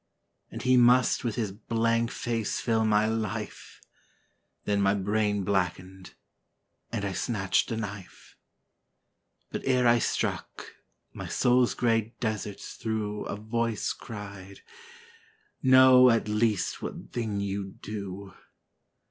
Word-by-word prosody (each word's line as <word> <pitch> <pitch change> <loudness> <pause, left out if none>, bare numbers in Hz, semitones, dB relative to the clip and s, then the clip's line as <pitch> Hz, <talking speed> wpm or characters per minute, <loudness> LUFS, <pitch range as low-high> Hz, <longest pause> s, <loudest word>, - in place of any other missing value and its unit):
And - - -7
he 130 0 +4
must 125 +2 +4
with 115 -3 -2
his 110 -5 -2
blank 115 +2 0
face 115 -3 -2
fill 110 -2 +1
my 105 0 +3
life 110 -1 -4 0.9
Then 100 -1 +1
my 100 0 +3
brain 105 0 0
blackened; 95 -1 -2 0.8
and 110 -3 -2
I 100 - -2
snatched 95 -2 0
a 115 - -2
knife. 105 -4 -8 1.2
But - - -4
ere 125 -2 +2
I 120 0 +5
struck, - - -3 0.4
my - - -7
soul's 125 0 +2
grey 115 -1 0
deserts 110 -3 -4
through 105 -2 -3
A - - -4
voice 110 +1 -2
cried, 100 -3 -9 1.0
'Know 130 -1 +7
at 115 -2 +2
least 105 -2 0
what - - -7
thing 110 -4 -2
you 100 -1 -4
do.' 100 -2 -6
110 Hz, 120 wpm, -28 LUFS, 100-115 Hz, 1.2 s, Know